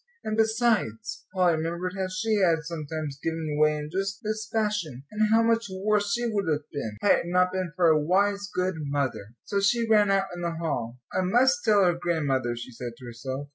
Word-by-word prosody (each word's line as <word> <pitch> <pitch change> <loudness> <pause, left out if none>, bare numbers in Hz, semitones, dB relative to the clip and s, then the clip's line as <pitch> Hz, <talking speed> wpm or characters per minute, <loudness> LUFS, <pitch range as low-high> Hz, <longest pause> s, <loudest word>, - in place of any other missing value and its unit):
And 215 - -2
besides, 220 - 0
Polly 180 -3 +2
remembered 170 +3 -3
how 190 -1 -1
she 185 +4 -1
had 170 -5 +3
sometimes 155 -3 -5
given 160 -2 -2
way 150 0 +4
in 150 0 -6
just 195 +2 -3
this 215 0 -3
fashion, 210 - -1
and 215 0 +1
how 225 +1 +5
much 230 0 +2
worse 200 +2 0
she 240 0 0
would 205 -5 -1
have 150 0 -2
been, 110 -8 -4
had - - +5
it - - -5
not 180 +1 +2
been 185 -2 -2
for 180 -2 +2
a 155 -1 +4
wise, 200 +4 +1
good 180 -1 -1
mother. 140 -7 -3
So 200 - 0
she 230 +4 +2
ran 210 -2 +4
out 195 0 +3
in 175 - -7
the 170 -1 -2
hall. 125 -8 -3 0.2
"I - - +1
must 260 +9 +3
tell 210 -3 +4
her 175 - +4
grandmother," 145 -8 -1
she 120 +2 -8
said 120 0 -6
to 130 - -12
herself. 130 +4 -6
180 Hz, 210 wpm, -26 LUFS, 150-205 Hz, 0.2 s, how